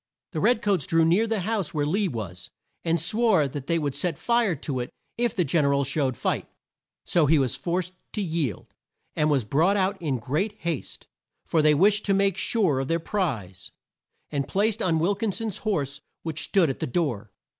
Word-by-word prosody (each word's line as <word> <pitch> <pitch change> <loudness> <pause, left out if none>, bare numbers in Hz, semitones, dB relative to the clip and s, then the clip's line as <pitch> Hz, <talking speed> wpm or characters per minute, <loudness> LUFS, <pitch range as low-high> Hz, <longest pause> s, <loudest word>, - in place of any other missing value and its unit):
The - - -3
red 245 -2 +2
coats 195 -9 +1
drew 165 0 +3
near 185 +8 +3
the 220 -3 0
house 200 -4 -2
where 145 -1 +1
Lee 195 +7 +1
was, 95 - -6 0.3
and 165 0 +1
swore 200 -3 +3
that 140 0 -7
they 170 - +2
would 145 -4 -1
set 160 +2 -1
fire 235 -6 +2
to 135 -2 -4
it 120 - -3 0.3
if 240 -1 0
the 180 - +2
Gen 155 +2 +2
er 140 - +3
al 140 - +2
showed 135 -2 -1
fight. - - -1 0.6
So 165 -4 +3
he 160 +2 +5
was 130 -4 +1
forced 180 +1 -2 0.2
to 210 - -1
yield, 160 - -3 0.4
and 150 0 +2
was 135 -6 +2
brought 165 - +2
out 190 0 0
in 145 -6 -1
great 150 - -1
haste 165 -5 -4 0.4
for 160 - +2
they 150 0 +5
wished 205 +6 +4
to 195 - +2
make 195 -1 +2
sure 190 - +1
of 135 - -2
their 165 +2 +1
prize 130 - -3 0.6
and 140 -2 -1
placed 215 +3 +1
on 165 -3 +2
Wil 170 +6 +2
kin 215 +1 -1
son's 220 -1 -3
horse 145 -10 -2 0.2
which 160 -1 -3
stood 175 -7 +3
at - - -8
the - - -2
door. 120 - -1
165 Hz, 205 wpm, -25 LUFS, 140-200 Hz, 0.6 s, he